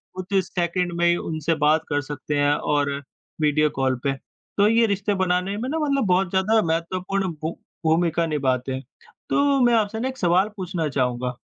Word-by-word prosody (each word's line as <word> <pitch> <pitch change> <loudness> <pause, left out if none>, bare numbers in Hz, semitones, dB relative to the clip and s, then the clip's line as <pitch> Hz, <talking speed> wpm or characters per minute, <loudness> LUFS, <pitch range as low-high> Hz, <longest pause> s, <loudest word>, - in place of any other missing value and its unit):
कुछ 185 +1 -6
सेकंड 175 0 -1
में 175 - +3
ही 175 - +4
उनसे 160 0 -2
बात 155 +1 +4
कर 145 0 +1
सकते 145 +1 -4
हैं 145 0 +3
और 145 -1 0 0.5
वीडियो 150 0 +3
कॉल 130 -1 +2
पे। 140 - +1 0.4
तो 205 0 +5
ये 230 +1 +4
रिश्ते 200 +1 0
बनाने 180 +2 0
में 245 +4 -3
ना 320 - -1
मतलब 280 -5 +1
बहुत 185 0 +2
ज़्यादा 205 +4 +2
महत्वपूर्ण 185 +4 -1
भू 160 +1 -2 0.3
भूमिका 165 +1 +2
निभाते 130 -4 -1
हैं। 130 +1 -5 0.5
तो 280 -1 +3
मैं 240 -1 +4
आपसे 220 +2 0
एक 260 - -8
सवाल 185 +3 +3
पूछना 175 -5 -2
चाहूँगा। 125 -2 -1
175 Hz, 175 wpm, -23 LUFS, 150-200 Hz, 0.5 s, तो